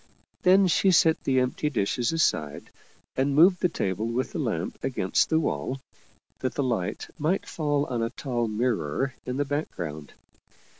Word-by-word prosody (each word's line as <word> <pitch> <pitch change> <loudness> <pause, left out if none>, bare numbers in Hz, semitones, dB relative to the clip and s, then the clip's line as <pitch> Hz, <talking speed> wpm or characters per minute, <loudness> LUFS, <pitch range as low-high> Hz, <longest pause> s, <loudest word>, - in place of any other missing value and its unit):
Then 190 +2 +6
she 185 +2 +3
set 160 -3 +4
the 130 -1 +3
empty 130 +4 0
dishes 120 0 0
aside 80 - 0 0.4
and 135 +1 +1
moved 180 +4 +6
the 180 - +3
table 105 - -2
with 120 +3 -2
the - - -4
lamp - - -3
against - - +1
the 160 - +3
wall, 135 -4 -2 0.6
that 130 - -2
the 140 - 0
light 115 -9 -2
might 160 +6 0
fall 145 -2 -1
on 120 -4 -2
a 115 - 0
tall 120 -2 -2
mirror 110 - -1
in 125 +1 -2
the 145 - +1
background. 85 - -4
130 Hz, 160 wpm, -26 LUFS, 115-155 Hz, 0.6 s, Then